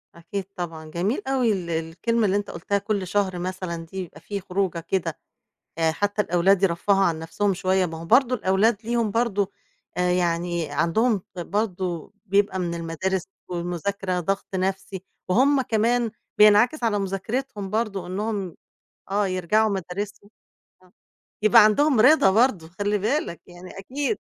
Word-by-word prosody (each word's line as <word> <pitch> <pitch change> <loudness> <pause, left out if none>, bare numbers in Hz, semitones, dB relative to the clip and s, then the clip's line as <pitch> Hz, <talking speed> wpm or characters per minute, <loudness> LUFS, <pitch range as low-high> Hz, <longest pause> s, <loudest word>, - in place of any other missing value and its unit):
أكيد 180 +3 -5
طبعًا. 165 -3 -5
جميل 195 - -1
أوي 260 -4 +2
ال 180 -3 -4
الكلمة 170 +8 -1
اللي 195 0 +2
أنت 205 - -3
قُلتها 195 +4 -1
كلّ 200 -2 -2
شهر 190 -2 0
مثلًا 180 -2 -4
دي 190 +4 -11
يبقى 160 -3 -13
في 200 -1 -4
خروجة 185 -2 -1
كده، 165 -1 -2 0.6
آآ، 160 -1 +2
حتى 205 +4 0
الأولاد 185 +2 +3
يرفّهوا 195 +2 +2
عن 165 -3 +1
نَفْسهم 195 +5 -1
شوية، 185 0 +1
ما 160 -1 -7
هو 165 - -8
برضه 250 +8 +4
الأولاد 205 +2 +2
ليهم 230 -2 0
برضه 205 -3 0 0.5
آآ، 180 0 +1
يعني 170 -2 0
عندهم 190 - +1
برضه 185 -2 -3
بيبقى 200 -1 +2
من 170 -2 -2
المدارس 170 +3 -2 0.3
والمذاكرة 180 +1 -2
ضغط 195 +3 -2
نفسي، 190 0 -2 0.3
وهُم 265 +8 +4
كمان 230 +1 +1 0.3
بينعكس 215 +7 +5
على 210 -2 +2
مذاكرتهم 200 +2 -3
برضه 210 -5 -2
إن 185 +3 -4
هُم 205 -6 -3 0.6
آه، 205 0 +2
يرجعوا 190 +4 +2
مدارسهم 200 +2 -5 0.5
آه. 180 - -23 0.5
يبقى 215 +1 +7
عندهم 260 +4 +4
رضا 255 -4 +6
برضه، 205 -6 +2
خلّي 205 +3 -1
بالك 215 - -1
يعني 180 +2 -12
أكيد. 280 - -2
195 Hz, 150 wpm, -24 LUFS, 175-215 Hz, 0.6 s, يبقى